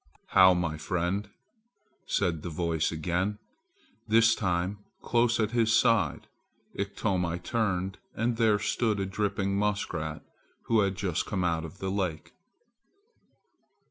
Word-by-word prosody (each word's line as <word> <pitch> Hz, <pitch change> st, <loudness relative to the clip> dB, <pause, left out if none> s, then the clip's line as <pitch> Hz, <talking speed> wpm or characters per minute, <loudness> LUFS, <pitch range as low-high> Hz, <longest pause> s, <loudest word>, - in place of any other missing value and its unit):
"How, 95 Hz, -1 st, +7 dB
my 80 Hz, -3 st, -2 dB
friend!" 90 Hz, +5 st, -2 dB, 0.8 s
said 80 Hz, -3 st, 0 dB
the 85 Hz, -, -5 dB
voice 80 Hz, -1 st, -1 dB
again, 90 Hz, +5 st, -1 dB, 0.7 s
this 115 Hz, +1 st, +5 dB
time 90 Hz, +1 st, -1 dB, 0.2 s
close 120 Hz, 0 st, +2 dB
at 110 Hz, -1 st, +1 dB
his 115 Hz, -2 st, +2 dB
side. 115 Hz, -, +2 dB, 0.5 s
Iktomi 95 Hz, -4 st, -1 dB
turned 95 Hz, -1 st, -1 dB, 0.2 s
and 115 Hz, +1 st, 0 dB
there 110 Hz, -3 st, +4 dB
stood 110 Hz, 0 st, 0 dB
a 95 Hz, -, 0 dB
dripping 100 Hz, 0 st, -1 dB
muskrat 90 Hz, -7 st, -2 dB, 0.4 s
who 115 Hz, -, +2 dB
had 100 Hz, -2 st, +1 dB
just 90 Hz, -4 st, -2 dB
come 95 Hz, -3 st, -1 dB
out 85 Hz, -2 st, 0 dB
of 90 Hz, +4 st, -10 dB
the 95 Hz, 0 st, -3 dB
lake. 90 Hz, -5 st, -3 dB
95 Hz, 125 wpm, -28 LUFS, 85-105 Hz, 0.8 s, How